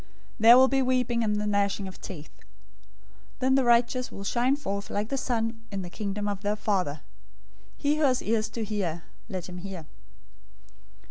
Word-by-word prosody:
There 230 +3 +9
will 260 +1 +7
be 270 0 +2
weeping 250 -2 +1
and 210 -1 +1
the 210 0 -1
gnashing 200 -1 0
of 185 - -11
teeth. 160 -6 -8
013:043 - - -24 0.9
Then 260 0 +2
the 270 0 +4
righteous 240 +1 +2
will 195 - -7
shine 245 +6 +2
forth 200 -8 -4
like 210 +2 -2
the 275 - -1
sun 225 -3 -1
in 195 -1 -3
the 175 - -8
Kingdom 205 0 -3
of 200 -1 -3
their 205 0 0
Father. 185 -9 -1 0.8
He 295 +1 +1
who 310 - 0
has 255 -2 +2
ears 220 0 0
to 225 0 -4
hear, 190 -6 -3 0.3
let 185 -4 -5
him 180 -1 -8
hear. 185 -3 -7
215 Hz, 185 wpm, -27 LUFS, 195-245 Hz, 0.9 s, There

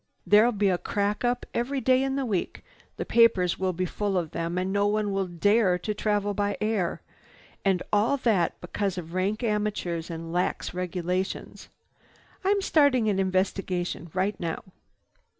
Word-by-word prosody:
There'll 215 +4 +6
be 205 -3 +1
a 180 -1 +1
crack 205 +2 -1
up 245 0 0
every 265 +4 -1
day 255 +1 +3
in 270 0 0
the 275 -1 -1
week. 200 -7 -2 0.3
The - - -3
papers 200 -7 +4
will 190 0 +1
be 185 +1 -2
full 200 +2 -1
of 170 -3 -2
them 170 +1 -3
and 185 +1 -1
no 200 0 +2
one 210 0 0
will 195 -1 0
dare 185 +2 +3
to 210 +4 -3
travel 205 -1 0
by 205 0 -1
air. 210 -5 -1 0.6
And 190 -2 +2
all 215 +7 +3
that 215 -10 +1
because 190 +1 -2
of 170 -1 -6
rank 200 +5 -1
amateurs 210 -6 -1
and 165 0 -6
lax 180 0 -1
regulations. 180 +1 -3 0.7
I'm 400 +1 +2
starting 280 - +3
an 195 -2 +1
investigation 185 -2 -1
right 190 +2 0
now." 165 -2 -3
200 Hz, 165 wpm, -27 LUFS, 180-215 Hz, 0.7 s, There'll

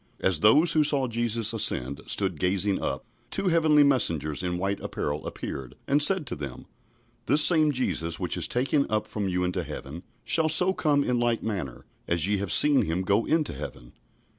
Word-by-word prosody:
As 95 -5 +1
those 150 - +5
who 155 - +3
saw 140 -3 +2
Jesus 115 -1 0
ascend 70 - -1
stood 95 -6 -1
gazing 95 +2 0
up, 65 - -4 0.2
two 195 -1 -1
heavenly 155 -3 +4
messengers 85 - 0
in 90 -1 -3
white 100 +2 -2
apparel 75 +1 -4
appeared 65 -1 -7
and 145 +2 +2
said 180 +2 +4
to - - -5
them, 70 -3 -8 0.6
"This 145 +4 +6
same 155 -3 +4
Jesus, 85 - -2
which - - -3
is - - 0
taken 135 +3 0
up 110 0 -1
from 105 -2 -4
you 90 0 -1
into 90 0 -2
heaven, 75 +1 -8 0.2
shall 160 -1 +1
so 180 +4 +3
come 145 -5 +1
in 125 -2 -1
like 120 -1 -1
manner 90 - -5 0.2
as 85 0 +1
ye 105 0 0
have 100 -2 -4
seen 145 -2 +4
him 85 +4 -2
go 100 +4 +1
into 155 -1 0
heaven." - - -9
105 Hz, 190 wpm, -26 LUFS, 85-145 Hz, 0.6 s, This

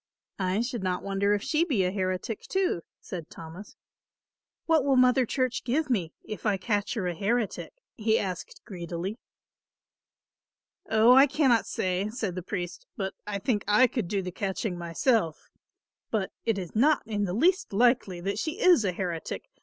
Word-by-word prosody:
"I 185 +3 +1
should 240 -2 -3
not 180 -1 -1
wonder 200 +1 +1
if 205 - -3
she 320 +1 +2
be 265 - +1
a 180 - +1
heretic, 185 +3 -2
too," 380 - +1 0.2
said 170 -4 -7
Thomas. 165 +5 -10 0.9
"What 320 -4 +3
will 275 -1 +3
Mother 255 0 +4
Church 255 0 -1
give 280 +3 0
me, 180 -9 0
if 215 - -7
I 210 -3 +2
catch 205 +2 -1
her 210 -5 -2
a 175 - -1
heretic?" 210 +4 -1 0.2
he 220 0 +2
asked 185 -3 -5
greedily. 180 +2 -5 1.7
"Oh, 220 +3 +6
I 270 +2 +8
cannot 265 -6 +2
say," 185 +2 -1
said 215 -5 -3
the 185 - -4
priest, 180 - -5
"but 195 -2 -2
I 205 -1 -2
think 205 +1 0
I 210 +5 +6
could 235 -5 -2
do 195 +1 -1
the 180 - -4
catching 190 +1 -3
myself; 170 - 0 0.6
but 210 -4 -1
it 225 -3 +1
is 185 0 -6
not 290 +7 +4
in 210 -2 -1
the 180 - -3
least 365 - +2
likely 225 -4 +2
that 200 +3 -2
she 320 - -3
is 360 - +5
a 185 -3 0
heretic. 175 -3 -4
210 Hz, 170 wpm, -28 LUFS, 185-245 Hz, 1.7 s, I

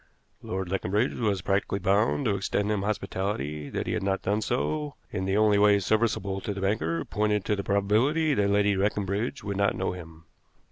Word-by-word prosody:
Lord 95 0 -4
Leconbridge 95 +5 0
was 100 -6 0
practically 100 0 0
bound 100 +8 +1
to 105 - +2
extend 100 +1 -1
him 105 -2 0
hospitality; 95 -7 -3
that - - -3
he - - -2
had - - -1
not 95 0 -1
done 105 +2 0
so, 145 +6 -2 0.2
in 95 -3 -2
the 95 +1 +1
only 105 -1 +4
way 105 0 +6
serviceable 100 -1 0
to 100 - -4
the 100 - -5
banker, 85 -5 0
pointed 105 0 0
to 105 - +1
the 100 - -4
probability 115 +12 +2
that 100 -5 +2
Lady 100 0 +3
Leconbridge 100 +5 -1
would 100 -1 -3
not 100 0 +2
know - - -1
him. 80 -3 -10
100 Hz, 190 wpm, -27 LUFS, 95-105 Hz, 0.2 s, way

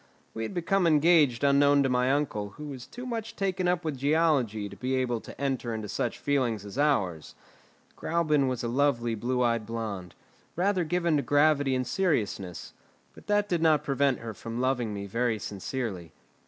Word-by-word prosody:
We 110 - -5
had 115 - -4
become 180 +1 +1
engaged 150 -5 +4
unknown 140 0 +5
to - - +2
my 125 +1 +2
uncle, 105 -8 -2
who 150 - -7
was 135 -4 -8
too 250 +1 -9
much 230 -3 -4
taken 190 -2 -1
up 175 -1 0
with 145 -4 -3
geology 140 -8 +1
to 100 - -10
be 130 +5 -2
able 125 -3 -1
to - - -12
enter 130 -4 -2
into 110 -1 -5
such - - -2
feelings 120 -7 0
as 100 - -9
ours. 95 - 0 0.6
Gräuben 150 -5 +1
was 125 -2 -2
a - - -1
lovely 120 -2 +1
blue 125 +3 -1
eyed 115 -3 0
blonde, 110 -6 -5 0.4
rather 185 +1 +1
given 170 -1 +1
to - - +1
gravity 145 0 +3
and 130 0 -1
seriousness; 115 - -2 0.4
but - - -16
that 205 0 +2
did 175 -4 0
not 155 -3 +4
prevent 140 -2 +1
her 115 -1 -6
from 115 +3 -6
loving 125 -3 0
me 100 -1 -5
very 115 +2 0
sincerely. 100 -4 -5
130 Hz, 180 wpm, -28 LUFS, 115-155 Hz, 0.6 s, unknown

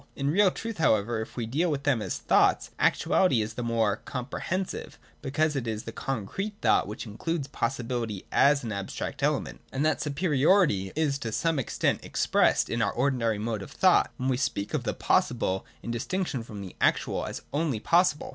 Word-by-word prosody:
In 140 +1 0
real 195 +3 +5
truth, 225 +1 -6
however, 110 -4 +2
if 110 - -8
we 120 - -1
deal 150 +10 0
with 140 -2 -2
them 135 -6 +2
as 95 - -3
thoughts, - - +2
actuality 180 -11 +3
is 110 +1 -6
the 120 - -5
more 115 -3 +1
comprehensive, 140 +11 -4 0.2
because 150 +2 0
it 125 -4 -2
is 110 -1 -3
the 115 - -6
concrete 135 - -4
thought - - +3
which 105 +3 -6
includes 140 +7 -3
possibility 115 -5 -3
as 140 -1 +4
an 115 - -4
abstract 100 -1 -4
element. - - -1
And 135 +3 -1
that 155 -2 +1
superiority 150 - +2
is 145 -3 0
to 115 -5 -4
some 165 +5 0
extent 130 - 0
expressed - - +2
in 115 - -1
our 100 - +2
ordinary 120 -4 +1
mode 110 0 -3
of - - -8
thought 185 -1 +4
when 130 -2 -2
we 130 - +1
speak 105 -6 -2
of - - -1
the - - -1
possible, 95 +1 +1 0.2
in 115 - -4
distinction 140 +3 -2
from 105 -3 -8
the 95 -2 -9
actual, - - +1
as - - -6
only 145 -6 0
possible. 170 - +2
130 Hz, 185 wpm, -27 LUFS, 110-155 Hz, 0.2 s, real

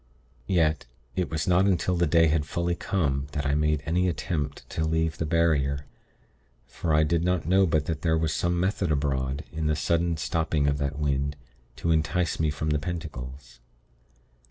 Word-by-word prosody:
Yet, 80 -6 +1 0.3
it 90 - -1
was 80 -1 -2
not 90 +2 +4
until 90 -1 +1
the 85 -1 +2
day 80 +2 +5
had 80 -1 +2
fully 85 +2 -1
come, 70 -7 -1
that 75 -2 -2
I 70 - +1
made 75 -1 +1
any 90 +3 +1
attempt 75 -4 -3
to 80 - -1
leave 80 0 0
the 80 - -1
barrier, 70 -4 +1 0.8
for 70 +6 -3
I 75 0 +4
did 85 +2 +1
not 90 -2 0
know 95 +3 +4
but 80 -2 +1
that 80 -3 -3
there 80 -1 +2
was 80 -1 0
some 85 0 0
method 95 -2 0
abroad, 70 -1 -1
in 80 -1 -2
the 75 - +2
sudden 85 +2 +1
stopping 80 0 0
of 70 0 +1
that 70 0 -2
wind, 70 -1 0 0.4
to 85 - -1
entice 80 +2 +1
me 80 -1 +2
from 75 +1 -2
the 75 - +2
pentacles. 70 -6 -7
80 Hz, 180 wpm, -26 LUFS, 75-85 Hz, 0.8 s, day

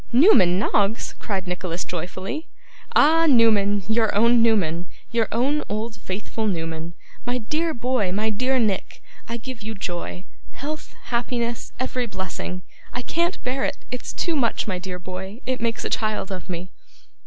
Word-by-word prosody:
'Newman 235 - +7
Noggs!' 205 +1 +1
cried 195 -3 -2
Nicholas 180 -1 -2
joyfully 185 - -4 0.5
'Ah! 325 +2 +6
Newman, 210 -6 +5
your 220 -1 +2
own 235 +3 +5
Newman, 180 -7 +2 0.2
your 230 -2 +2
own 275 +6 +2
old 220 +2 -2
faithful 205 +3 -3
Newman! 165 -2 -3 0.3
My 245 0 0
dear 305 +8 0
boy, 245 -7 0
my 215 +3 +1
dear 255 +5 +1
Nick, 215 -6 0 0.3
I 235 - -2
give 245 0 -7
you 220 +1 -4
joy 180 -1 -4 0.3
health, 305 +3 -6 0.2
happiness, 235 0 -1
every 255 -1 -1
blessing! 185 -2 -5 0.3
I 250 - -4
can't 340 +7 0
bear 260 +2 -1
it - - 0
it's 250 - -4
too 340 -2 0
much, 240 -6 +1
my 185 -3 -1
dear 180 0 -5
boy 190 +4 -7
it 255 -2 -1
makes 230 -1 -1
a - - 0
child 215 -3 0
of 185 0 -5
me! 180 +1 -4
220 Hz, 155 wpm, -24 LUFS, 190-250 Hz, 0.5 s, Newman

